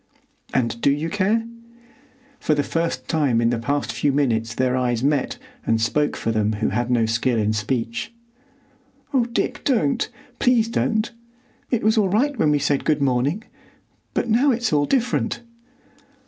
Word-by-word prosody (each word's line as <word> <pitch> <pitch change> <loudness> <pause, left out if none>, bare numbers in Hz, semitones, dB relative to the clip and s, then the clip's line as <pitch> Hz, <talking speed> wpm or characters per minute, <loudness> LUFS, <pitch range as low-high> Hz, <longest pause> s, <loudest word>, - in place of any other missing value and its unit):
"And 115 -2 -1
do - - +4
you 150 +4 -1
care?" 210 +3 +1 0.9
For 155 - +1
the 145 - +1
first 165 +2 -2
time 145 -8 +2
in 115 0 +2
the 120 - -1
past 140 +4 -1
few 145 - +1
minutes 115 -5 0
their 130 0 +1
eyes 125 -2 0
met 145 - +1 0.3
and 115 - +1
spoke 145 +7 +1
for 115 - -1
them 110 -1 +1
who 110 +1 0
had 120 +4 -1
no 120 -2 +3
skill 115 +2 +1
in 110 0 +1
speech.... 115 - -2 1.0
"Oh, 255 -4 +3
Dick, 240 +2 -2
don't! 220 - +1 0.3
Please 245 -3 +3
don't! 220 -1 0 0.6
It 240 - 0
was 220 +1 +3
all 200 -3 +2
right 265 +9 +1
when 155 - +3
we 150 - +3
said 145 -1 0
good 155 -1 +1
morning; 140 - +1 0.7
but - - 0
now 240 +6 +3
it's 240 - 0
all 145 -1 +3
different!" 245 -2 0
145 Hz, 165 wpm, -22 LUFS, -, 1.0 s, do